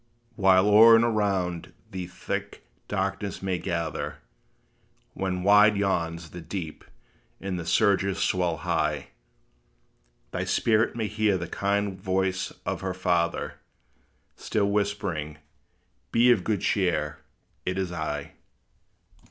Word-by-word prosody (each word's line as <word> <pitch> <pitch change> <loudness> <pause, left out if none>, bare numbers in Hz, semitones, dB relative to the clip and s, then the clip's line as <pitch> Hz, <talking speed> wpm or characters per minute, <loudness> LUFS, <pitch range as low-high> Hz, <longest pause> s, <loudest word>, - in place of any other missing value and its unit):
While 95 -2 +4
o'er 110 +2 +8
and 115 +1 +4
around 95 -6 -1 0.2
thee 95 -2 -5
thick 90 - -5 0.2
darkness - - -3
may 95 -2 -1
gather; 85 -3 -3 1.0
When 90 -1 -2
wide 105 +1 +6
yawns 85 -5 -1
the 90 - -8
deep, 80 -1 -6 0.6
and 95 -2 -3
the 85 - -6
surges 100 -2 +2
swell 90 -3 0
high, 75 -2 0 1.2
Thy - - -2
spirit 110 0 +2
may 115 -2 -1
hear 105 -2 +1
the 85 - -4
kind 100 +1 -1
voice 95 0 -1
of - - -2
her 95 -1 -3
Father, 85 -2 -1 0.8
Still 100 -2 -1
whispering, 100 -7 -2 0.7
"Be 120 +2 +5
of 105 -7 +3
good 105 -2 -1
cheer; 85 -7 0 0.4
it 90 +1 -2
is 95 -2 -2
I." 80 -4 -4
95 Hz, 120 wpm, -26 LUFS, 85-100 Hz, 1.2 s, o'er